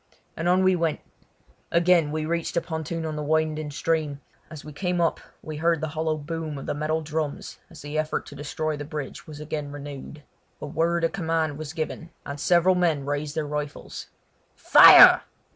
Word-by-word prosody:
and 165 Hz, +2 st, -1 dB
on 185 Hz, +1 st, +3 dB
we 185 Hz, 0 st, +4 dB
went. 165 Hz, -3 st, -1 dB, 0.7 s
Again 170 Hz, -3 st, +3 dB
we 155 Hz, 0 st, -2 dB
reached 170 Hz, +1 st, -2 dB
a -, -, +3 dB
pontoon 160 Hz, 0 st, -5 dB
on 155 Hz, -1 st, -4 dB
the 150 Hz, -, -4 dB
winding 155 Hz, 0 st, -1 dB
stream; 150 Hz, -1 st, -2 dB, 0.3 s
as 155 Hz, -3 st, -10 dB
we 150 Hz, -, -9 dB
came 180 Hz, +3 st, -2 dB
up 165 Hz, -2 st, +1 dB, 0.2 s
we 155 Hz, -1 st, -6 dB
heard 165 Hz, +1 st, +1 dB
the 160 Hz, 0 st, -3 dB
hollow 155 Hz, 0 st, -2 dB
boom 155 Hz, 0 st, -5 dB
of 135 Hz, -, -8 dB
the -, -, -2 dB
metal 155 Hz, +2 st, -2 dB
drums 155 Hz, -1 st, -4 dB
as 160 Hz, -4 st, -13 dB
the 145 Hz, +1 st, -3 dB
efforts 155 Hz, 0 st, -3 dB
to -, -, -10 dB
destroy 150 Hz, +2 st, -3 dB
the 145 Hz, -, -6 dB
bridge 145 Hz, -2 st, -7 dB
was 150 Hz, -2 st, -10 dB
again 150 Hz, -1 st, -5 dB
renewed. 145 Hz, +1 st, -9 dB, 0.4 s
A -, -, -6 dB
word 165 Hz, +3 st, 0 dB
of 165 Hz, -, +1 dB
command 160 Hz, -5 st, -2 dB
was 155 Hz, 0 st, -6 dB
given, 165 Hz, +1 st, -5 dB, 0.2 s
and 140 Hz, 0 st, -6 dB
several 175 Hz, +4 st, +3 dB
men 165 Hz, -6 st, 0 dB
raised 145 Hz, +1 st, -3 dB
their 155 Hz, -2 st, -1 dB
rifles. 150 Hz, 0 st, -6 dB, 0.5 s
"Fire!" -, -, +9 dB
155 Hz, 190 wpm, -25 LUFS, 150-165 Hz, 0.7 s, Fire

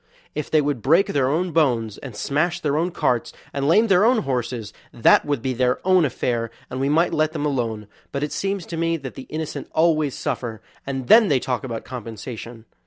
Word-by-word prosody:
If 150 Hz, -1 st, -4 dB
they 155 Hz, -, +4 dB
would 145 Hz, -4 st, -1 dB
break 165 Hz, -, +4 dB
their 140 Hz, -10 st, +1 dB
own 170 Hz, +5 st, 0 dB
bones, 120 Hz, -9 st, +1 dB
and 130 Hz, -6 st, -9 dB
smash 150 Hz, +10 st, 0 dB
their 145 Hz, -2 st, 0 dB
own 165 Hz, +4 st, +1 dB
carts, 125 Hz, -8 st, 0 dB, 0.2 s
and 140 Hz, 0 st, -1 dB
lame 210 Hz, +8 st, +5 dB
their 195 Hz, -3 st, +4 dB
own 230 Hz, -1 st, +3 dB
horses, 125 Hz, -4 st, -3 dB, 0.2 s
that 115 Hz, -, +4 dB
would 145 Hz, -5 st, -1 dB
be 130 Hz, -1 st, 0 dB
their 125 Hz, 0 st, +1 dB
own 185 Hz, -3 st, +5 dB
affair, 120 Hz, -3 st, -1 dB, 0.2 s
and 130 Hz, -, -4 dB
we 135 Hz, +1 st, +1 dB
might 165 Hz, +4 st, +2 dB
let 155 Hz, 0 st, +1 dB
them 150 Hz, -2 st, -2 dB
alone, 115 Hz, -7 st, -2 dB, 0.3 s
but 140 Hz, 0 st, -2 dB
it 150 Hz, -, -3 dB
seems 195 Hz, -3 st, -2 dB
to 165 Hz, -, -6 dB
me 165 Hz, 0 st, +1 dB
that 135 Hz, -4 st, -8 dB
the 130 Hz, -, -10 dB
innocent 155 Hz, -2 st, -5 dB
always 155 Hz, -4 st, +2 dB
suffer; 115 Hz, -3 st, -3 dB, 0.3 s
and 135 Hz, -2 st, -3 dB
then 220 Hz, -, +7 dB
they 140 Hz, -7 st, +3 dB
talk 125 Hz, +1 st, -2 dB
about 115 Hz, -4 st, -5 dB
compensation! 115 Hz, -1 st, -8 dB
140 Hz, 210 wpm, -22 LUFS, 125-165 Hz, 0.3 s, then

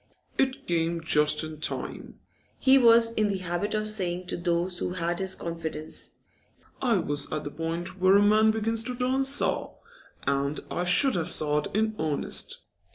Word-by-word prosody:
'It 265 Hz, 0 st, 0 dB
came 170 Hz, 0 st, -1 dB
just 150 Hz, -1 st, +3 dB
in 155 Hz, -1 st, -8 dB
time,' -, -, -5 dB, 0.4 s
he 265 Hz, 0 st, +4 dB
was 230 Hz, -3 st, +5 dB
in 215 Hz, -2 st, 0 dB
the 200 Hz, -1 st, -2 dB
habit 185 Hz, +3 st, -2 dB
of 215 Hz, 0 st, -1 dB
saying 185 Hz, -4 st, 0 dB
to -, -, -4 dB
those 175 Hz, +1 st, -2 dB
who 180 Hz, -, -3 dB
had 175 Hz, -1 st, -2 dB
his 190 Hz, 0 st, 0 dB
confidence. 160 Hz, -2 st, -3 dB, 0.7 s
'I 240 Hz, -5 st, +2 dB
was 145 Hz, -3 st, -1 dB
at 155 Hz, -, -3 dB
the 145 Hz, -, -6 dB
point 165 Hz, +4 st, -4 dB
where 185 Hz, +1 st, +5 dB
a 205 Hz, -, +4 dB
man 215 Hz, +1 st, +4 dB
begins 220 Hz, +1 st, 0 dB
to 250 Hz, +2 st, -3 dB
turn 255 Hz, +2 st, 0 dB
sour, 270 Hz, +2 st, 0 dB, 0.5 s
and 140 Hz, +1 st, -1 dB
I 175 Hz, -, -2 dB
should 180 Hz, +10 st, +5 dB
have 170 Hz, -4 st, -1 dB
soured 150 Hz, -1 st, +2 dB
in 220 Hz, +1 st, +1 dB
earnest. 155 Hz, -2 st, -1 dB
180 Hz, 170 wpm, -26 LUFS, 165-220 Hz, 0.7 s, was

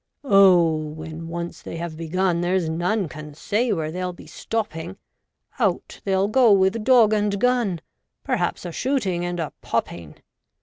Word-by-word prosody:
Oh! 190 Hz, -, +5 dB
when 155 Hz, +1 st, -7 dB
once 170 Hz, 0 st, -6 dB
they -, -, -7 dB
have 170 Hz, -1 st, -5 dB
begun, 170 Hz, +2 st, 0 dB
there's 180 Hz, -1 st, 0 dB
none 175 Hz, +5 st, 0 dB
can 150 Hz, -1 st, -10 dB
say 225 Hz, +9 st, 0 dB
where 160 Hz, -4 st, -1 dB
they'll 180 Hz, +1 st, -3 dB
be -, -, -14 dB
stopping 195 Hz, -5 st, -4 dB, 0.3 s
— -, -, -33 dB
Out -, -, -1 dB
they'll 195 Hz, 0 st, +2 dB
go 235 Hz, +1 st, +4 dB
with 195 Hz, +3 st, +3 dB
dog 235 Hz, -3 st, +5 dB
and 205 Hz, -1 st, 0 dB
gun; 235 Hz, -8 st, +1 dB, 0.4 s
perhaps -, -, -1 dB
a 175 Hz, -, -4 dB
shooting 200 Hz, -, -1 dB
and 175 Hz, 0 st, -3 dB
a 160 Hz, -3 st, -3 dB
popping. 85 Hz, -3 st, -3 dB
180 Hz, 160 wpm, -23 LUFS, 165-210 Hz, 0.4 s, Oh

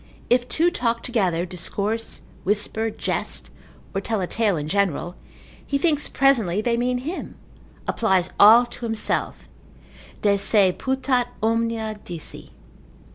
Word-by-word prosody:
If 245 Hz, 0 st, +3 dB
two 335 Hz, +6 st, +2 dB
talk 235 Hz, -7 st, -1 dB
together, 185 Hz, -8 st, 0 dB
discourse, 200 Hz, +5 st, -3 dB, 0.2 s
whisper, 210 Hz, +3 st, 0 dB
jest, -, -, -2 dB, 0.4 s
or 195 Hz, -, -1 dB
tell 220 Hz, +1 st, -2 dB
a 185 Hz, -, -1 dB
tale 205 Hz, -1 st, 0 dB
in 150 Hz, 0 st, -4 dB
general, 185 Hz, -2 st, 0 dB, 0.5 s
he 280 Hz, -, -1 dB
thinks 295 Hz, 0 st, +1 dB
presently 230 Hz, -9 st, +2 dB
they 235 Hz, +2 st, +1 dB
mean 245 Hz, +1 st, 0 dB
him, 335 Hz, +5 st, -5 dB, 0.5 s
applies 190 Hz, -5 st, +1 dB
all 225 Hz, +4 st, +8 dB
to 240 Hz, 0 st, -8 dB
himself, 225 Hz, -1 st, 0 dB, 0.8 s
de 200 Hz, -1 st, +3 dB
se 200 Hz, -1 st, +4 dB
putat 260 Hz, -2 st, 0 dB, 0.2 s
omnia 225 Hz, -1 st, -1 dB
dici. 170 Hz, -3 st, -9 dB
225 Hz, 130 wpm, -23 LUFS, 195-245 Hz, 0.8 s, all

